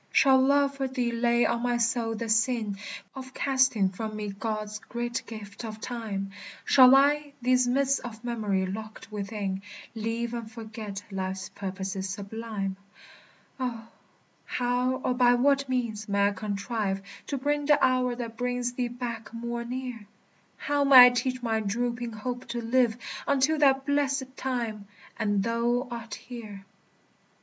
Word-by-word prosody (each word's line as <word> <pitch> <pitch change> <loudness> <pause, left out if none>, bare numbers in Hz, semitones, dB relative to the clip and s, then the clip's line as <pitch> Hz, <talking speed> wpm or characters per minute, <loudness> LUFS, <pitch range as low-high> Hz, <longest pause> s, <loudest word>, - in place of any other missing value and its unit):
Shall 265 -1 +6
love 280 +1 +3
for 270 -1 0
thee 250 -2 -1
lay 235 0 +2
on 235 - 0
my 245 0 +1
soul 230 -1 0
the 230 +1 -4
sin 225 -2 +1 0.3
Of 260 -1 -9
casting 260 -8 +3
from 215 +3 -5
me 210 -1 -4
God's 215 +1 -4
great 240 +1 -3
gift 210 -1 -8
of 220 -1 -6
time? 215 -5 -4 0.3
Shall 255 0 +8
I, 290 +1 +3
these 250 0 +3
mists 275 +2 +2
of 230 -2 -9
memory 210 -6 0
locked 215 +3 -7
within, 200 -2 -3 0.3
Leave 230 +1 -2
and 230 -2 -5
forget 220 -3 -7
life's 190 0 -3
purposes 190 0 -4
sublime? 200 -1 -4 0.8
O, 230 -3 -4 0.6
how 250 +1 0
or 255 - +2
by 245 -1 +5
what 275 +2 +2
means 230 -4 -2
may 200 0 +3
I - - -3
contrive 200 0 -2 0.2
To 280 - -2
bring 290 +2 0
the 295 -1 +6
hour 255 -1 +2
that 230 -2 -6
brings 245 0 -1
thee 245 -1 -1
back 240 -2 -6
more 235 +1 -4
near? 245 -3 -5 0.5
How 290 -1 0
may 265 -3 +11
I - - +8
teach 255 0 -1
my 225 -2 +1
drooping 235 +3 -2
hope 245 +4 -5
to 240 0 -3
live 235 0 +2 0.3
Until 280 +3 +3
that 270 -2 +4
blessèd 280 -2 +1
time, 230 -6 -3 0.3
and 205 -3 +1
thou 235 +3 0
art 230 -2 -5
here? 215 -5 -9
235 Hz, 150 wpm, -28 LUFS, 215-255 Hz, 0.8 s, may